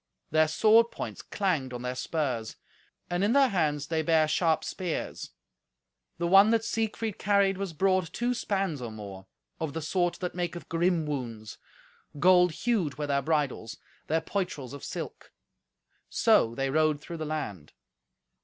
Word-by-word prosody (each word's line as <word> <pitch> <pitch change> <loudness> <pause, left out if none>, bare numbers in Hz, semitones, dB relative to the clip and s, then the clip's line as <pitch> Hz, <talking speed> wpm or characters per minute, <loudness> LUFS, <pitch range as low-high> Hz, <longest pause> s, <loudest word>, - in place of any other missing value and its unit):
Their 155 0 +4
sword 220 +8 +5
points - - -6
clanged 160 -11 -1
on 120 0 -6
their 125 0 -2
spurs, 130 -5 -2 0.5
and 175 +2 -1
in 210 +3 +3
their 275 -1 +5
hands 150 -7 0
they 160 0 -1
bare 160 -1 +3
sharp 160 0 +1
spears; 180 -4 -4 0.9
the 170 - -2
one 195 +4 +7
that 225 0 +2
Siegfried 225 -2 -2
carried 200 -1 +2
was 195 -3 -3
broad 185 0 +1
two 240 +1 -1
spans 195 - -2
or 120 -2 -5
more, 100 -3 -9 0.3
of 160 -3 -3
the 160 - -3
sort 175 +2 0
that 180 -2 -3
maketh 175 -1 -4
grim 170 -1 +1
wounds. 115 -7 -5 0.6
Gold 180 +2 +5
hued 200 - 0
were 150 - -2
their 140 -1 +1
bridles, 145 -7 -1 0.3
their 160 +1 +1
poitrels 160 -8 -4
of 140 - -9
silk; - - -7 0.8
so 115 +1 +3
they 135 +1 -1
rode 155 0 +2
through 170 +3 -8
the 160 - -4
land. 105 - -5
160 Hz, 155 wpm, -28 LUFS, 140-190 Hz, 0.9 s, one